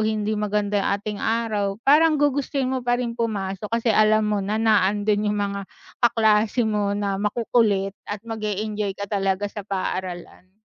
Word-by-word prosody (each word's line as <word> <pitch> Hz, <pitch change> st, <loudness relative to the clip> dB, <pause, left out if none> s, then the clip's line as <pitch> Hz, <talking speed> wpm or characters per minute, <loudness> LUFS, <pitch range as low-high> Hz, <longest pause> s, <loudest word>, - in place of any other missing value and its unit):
hindi 215 Hz, -1 st, -1 dB
maganda 210 Hz, -1 st, 0 dB
yung -, -, 0 dB
ating 205 Hz, 0 st, -6 dB
araw, 215 Hz, -3 st, -1 dB
parang 305 Hz, +3 st, +5 dB
gugustuhin 280 Hz, -2 st, 0 dB
mo 260 Hz, -, -1 dB
pa 245 Hz, 0 st, +1 dB
rin 245 Hz, -1 st, -2 dB
pumasok 210 Hz, -4 st, -3 dB
kasi 230 Hz, -1 st, +1 dB
alam 215 Hz, 0 st, +4 dB
mo 210 Hz, -1 st, 0 dB
na, 205 Hz, +2 st, -2 dB
na 215 Hz, -4 st, +3 dB
andun 210 Hz, +1 st, 0 dB
yung 210 Hz, -, 0 dB
mga 200 Hz, -1 st, -2 dB, 0.4 s
kaklase 225 Hz, 0 st, +3 dB
mo 205 Hz, -2 st, 0 dB
na 200 Hz, -1 st, -2 dB
makukulit 210 Hz, -2 st, +1 dB, 0.2 s
at 205 Hz, +1 st, -5 dB
mag-e-enjoy 210 Hz, -2 st, -3 dB
ka 200 Hz, -, -4 dB
talaga 195 Hz, -1 st, -1 dB
sa 205 Hz, +1 st, -5 dB
paaralan. 185 Hz, -1 st, -5 dB
210 Hz, 165 wpm, -23 LUFS, 200-225 Hz, 0.4 s, parang